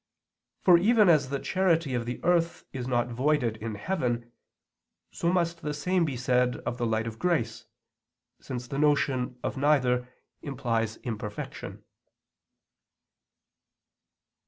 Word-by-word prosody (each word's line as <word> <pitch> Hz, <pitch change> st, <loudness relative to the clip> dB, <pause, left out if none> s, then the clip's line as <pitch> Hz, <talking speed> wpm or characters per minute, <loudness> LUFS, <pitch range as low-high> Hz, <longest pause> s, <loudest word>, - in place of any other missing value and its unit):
For 175 Hz, -2 st, +7 dB
even 215 Hz, +1 st, +5 dB
as 150 Hz, -5 st, +4 dB
the 140 Hz, -, -1 dB
charity 165 Hz, -4 st, +1 dB
of 120 Hz, -1 st, -2 dB
the 125 Hz, -, -4 dB
earth 170 Hz, 0 st, +1 dB
is 125 Hz, -2 st, -4 dB
not 120 Hz, -1 st, +1 dB
voided 125 Hz, -2 st, +1 dB
in 110 Hz, 0 st, -5 dB
heaven, 120 Hz, -, -2 dB, 0.8 s
so 170 Hz, -, 0 dB
must 170 Hz, -2 st, 0 dB
the 150 Hz, -2 st, -3 dB
same 180 Hz, +4 st, +1 dB
be 140 Hz, -5 st, -3 dB
said 125 Hz, 0 st, +2 dB
of 120 Hz, -, -3 dB
the 120 Hz, -, 0 dB
light 110 Hz, 0 st, 0 dB
of 115 Hz, -1 st, -6 dB
grace, 120 Hz, -11 st, 0 dB, 0.7 s
since 125 Hz, -2 st, -6 dB
the 135 Hz, +3 st, -3 dB
notion 135 Hz, -4 st, +1 dB
of -, -, -3 dB
neither 130 Hz, -4 st, +2 dB, 0.3 s
implies 115 Hz, -5 st, -2 dB
imperfection. 105 Hz, -3 st, -6 dB
130 Hz, 130 wpm, -28 LUFS, 120-165 Hz, 0.8 s, For